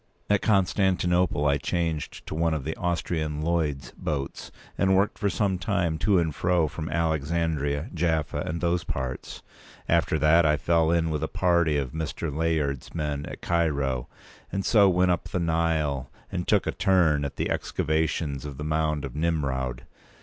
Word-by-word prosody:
At 105 - +3
Constantinople 90 -5 +2
I 70 -1 +3
changed 80 0 -3
to - - -6
one 80 0 +1
of 75 - -4
the 80 +3 -3
Austrian 80 -3 -2
Lloyd's 80 -4 -1
boats, 70 -3 -4 0.3
and 95 0 +3
worked 100 +2 +1
for 105 - +1
some 95 -3 0
time 85 -5 0
to 100 +1 +3
and 80 -3 +1
from 80 -2 0
Alexandria, 80 -2 -1
Jaffa, 80 -3 0
and 85 +1 -3
those 85 0 +1
parts. 65 -1 -5 0.4
After 80 - +2
that, 80 +3 +5
I 75 -1 +3
fell 80 +1 +2
in 85 -1 +2
with 75 -2 -2
a - - -1
party 85 -4 +2
of 70 -3 -2
Mr. 80 -1 -4
Layard's 80 -4 -1
men 75 -3 -2
at - - -8
Cairo, 70 -7 0 0.4
and 95 0 -2
so 105 -5 +5
went 90 0 +3
up 90 - -1
the 90 - -1
Nile 80 -5 0 0.2
and - - -3
took - - +3
a - - 0
turn 85 -6 +3
at 70 0 -4
the - - -2
excavations 75 -3 -1
of 70 -2 -7
the 75 - -5
mound 75 -1 0
of 65 - -7
Nimroud. 70 -6 -1
80 Hz, 165 wpm, -26 LUFS, 75-85 Hz, 0.4 s, that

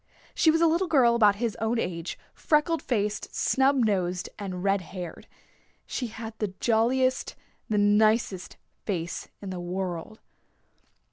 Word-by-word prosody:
She 320 - +4
was 325 +1 +3
a - - +6
little 335 +3 +2
girl 255 -7 +4
about 210 -4 +5
his 230 0 -2
own 225 +2 0
age, 170 -6 -3 0.2
freckle 315 +2 +1
faced, 210 -3 -2
snub 270 +1 +3
nosed 185 -3 -1
and 185 -3 -5
red 195 0 +2
haired. 180 -1 -8 0.6
She 250 - -3
had 220 0 -7
the 200 -3 -3
jolliest, 250 +3 +1 0.3
the 215 - +1
nicest 205 -1 +2 0.3
face 175 -4 -3 0.2
in 195 - -5
the 185 - -5
world. 180 +3 -4
215 Hz, 140 wpm, -27 LUFS, 185-245 Hz, 0.6 s, a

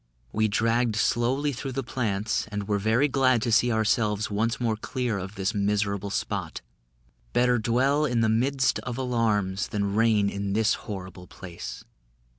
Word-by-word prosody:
We 110 0 +1
dragged 115 +2 +1
slowly 130 +6 +1
through 130 +1 -5
the 135 +1 -2
plants, 110 -4 -1
and 105 -1 -5
were 105 -1 +1
very 110 +7 +2
glad 130 -4 +2
to 120 - 0
see 120 +2 +4
ourselves 110 -1 +1
once 115 +5 0
more 115 -3 0
clear 120 -1 -3
of 95 +3 -7
this 100 +2 -1
miserable 100 -1 0
spot. - - -3 0.7
"Better 125 -1 +3
dwell 130 +7 +2
in 120 -5 +1
the 110 - +3
midst 130 +4 +1
of 125 -1 -5
alarms, 110 -6 0
Than 100 -1 -2
reign 110 -2 +3
in 100 0 -3
this 110 0 +3
horrible 95 -3 -7
place." 85 -1 -8
110 Hz, 160 wpm, -26 LUFS, 100-125 Hz, 0.7 s, see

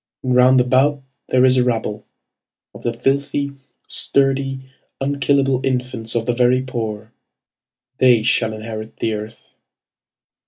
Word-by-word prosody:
And 130 -1 0
round 125 +1 +5
about 130 +3 +2 0.3
there 130 0 +4
is 130 0 +4
a 125 - +4
rabble 110 -3 -3 0.7
Of - - -12
the 120 - -1
filthy, 140 +3 -1 0.4
sturdy, 135 -1 +1 0.4
unkillable 135 -1 0
infants 125 -3 -1
of 115 -1 0
the 120 - 0
very 125 +1 +2
poor. 110 -4 -5 0.9
They 125 -4 +4
shall 110 -1 +2
inherit 110 0 -8
the 110 - -1
earth. 110 +2 -9
125 Hz, 125 wpm, -19 LUFS, 115-135 Hz, 0.9 s, round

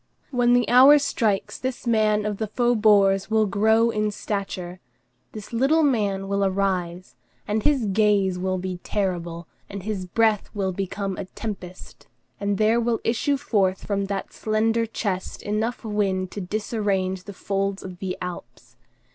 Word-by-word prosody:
When 245 -2 +3
the 245 -3 +3
hour 265 +4 +8
strikes, 220 -8 -1
this 260 -1 -4
man 215 -2 +2
of 210 -1 -2
the 220 - -1
faubourgs 210 -4 +3
will 220 -1 +3
grow 220 +3 +3
in 215 -1 0
stature; 190 -3 -4 0.5
this 215 +2 -9
little 275 +7 +3
man 205 -8 +1
will 200 0 0
arise, 185 -6 -1 0.3
and 215 +1 0
his 275 -2 +2
gaze 200 -2 +2
will 185 0 -1
be 185 0 -4
terrible, 175 -4 -3 0.2
and 200 -2 -7
his 200 -3 -4
breath 220 +2 +1
will 195 -2 -1
become 195 +1 -3
a 200 - -4
tempest, 185 -3 -8 0.3
and 200 -1 -1
there 220 +3 +3
will 230 -1 0
issue 260 +5 +1
forth 195 -8 0
from 200 -1 -1
that 195 0 -4
slender 225 +1 0
chest 195 -4 -4
enough 220 +3 -2
wind 195 -3 -1
to 205 - -5
disarrange 195 -2 -2
the 205 - -7
folds 195 0 -2
of 185 -2 -9
the 185 -1 -4
Alps. 180 -1 -9
205 Hz, 155 wpm, -24 LUFS, 190-225 Hz, 0.5 s, hour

